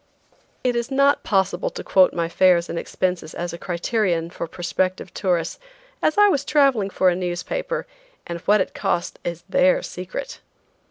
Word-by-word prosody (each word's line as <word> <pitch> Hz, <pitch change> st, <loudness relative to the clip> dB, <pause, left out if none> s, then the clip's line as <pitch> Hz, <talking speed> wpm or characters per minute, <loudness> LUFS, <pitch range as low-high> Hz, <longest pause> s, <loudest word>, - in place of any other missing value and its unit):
It 250 Hz, -1 st, +1 dB
is 235 Hz, +1 st, -1 dB
not 275 Hz, +1 st, +3 dB
possible 190 Hz, -2 st, 0 dB
to -, -, -7 dB
quote 185 Hz, -1 st, +4 dB
my 170 Hz, -1 st, -1 dB
fares 175 Hz, 0 st, +3 dB
and 170 Hz, -, -2 dB
expenses 180 Hz, -3 st, -2 dB
as 175 Hz, 0 st, -4 dB
a -, -, -5 dB
criterion 175 Hz, -2 st, -1 dB
for -, -, -5 dB
prospective 185 Hz, +1 st, -2 dB
tourists, 175 Hz, -4 st, -1 dB, 0.4 s
as 310 Hz, -, +1 dB
I 415 Hz, 0 st, +7 dB
was 285 Hz, -9 st, +1 dB
traveling 275 Hz, -9 st, +3 dB
for 185 Hz, -1 st, +3 dB
a 175 Hz, -, +1 dB
newspaper, 185 Hz, -, -3 dB, 0.4 s
and 170 Hz, 0 st, -5 dB
what 205 Hz, +4 st, +3 dB
it -, -, -3 dB
cost 175 Hz, -, -2 dB
is 170 Hz, 0 st, -4 dB
their 275 Hz, -, +3 dB
secret. -, -, -6 dB
185 Hz, 165 wpm, -22 LUFS, 175-270 Hz, 0.4 s, I